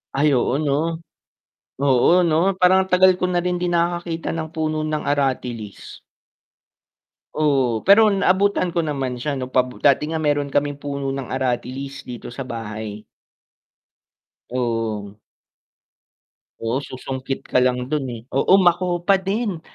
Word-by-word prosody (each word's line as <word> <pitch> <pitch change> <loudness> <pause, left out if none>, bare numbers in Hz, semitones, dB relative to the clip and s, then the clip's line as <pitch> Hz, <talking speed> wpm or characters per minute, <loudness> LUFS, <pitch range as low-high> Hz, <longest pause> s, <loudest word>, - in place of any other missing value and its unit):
Ay 145 +1 +3
oo, 125 +1 +1
'no? 155 +3 -1 0.8
Oo 140 +6 +4
'no, 170 +4 +2
parang 190 +1 +4
ang - - -25
tagal 185 +1 +6
ko 180 - +1
na 175 -1 0
rin 180 -1 -1
din 175 -1 -1
nakakakita 170 -1 -1
ng 160 -1 -4
puno 155 -1 -1
ng 155 0 -2
aratilis. 125 -7 -3 1.4
Oo, 135 -7 +1
pero 210 +3 +6
naabutan 195 -2 +2
ko 170 - -1
naman 135 -6 -2
siya 145 +1 -2
'no 130 -1 -5 0.3
dati 140 +1 +4
nga 160 - -1
meron 145 -1 +1
kaming 145 0 -1
puno 140 -1 -3
ng 135 -2 -5
aratilis 130 +2 -3
dito 120 -1 -8
sa 130 +1 -7
bahay. 110 -2 -6 1.5
Oo. 115 -4 -3 1.4
Oo, 115 +5 -1
susungkit 130 0 -6
ka 125 - +2
lang 125 0 +1
dun, 135 -2 -2
eh. 115 -2 -7
Oo, 160 +8 +4
makopa 175 0 +2
din. 195 -3 -2
145 Hz, 135 wpm, -21 LUFS, 130-175 Hz, 1.5 s, tagal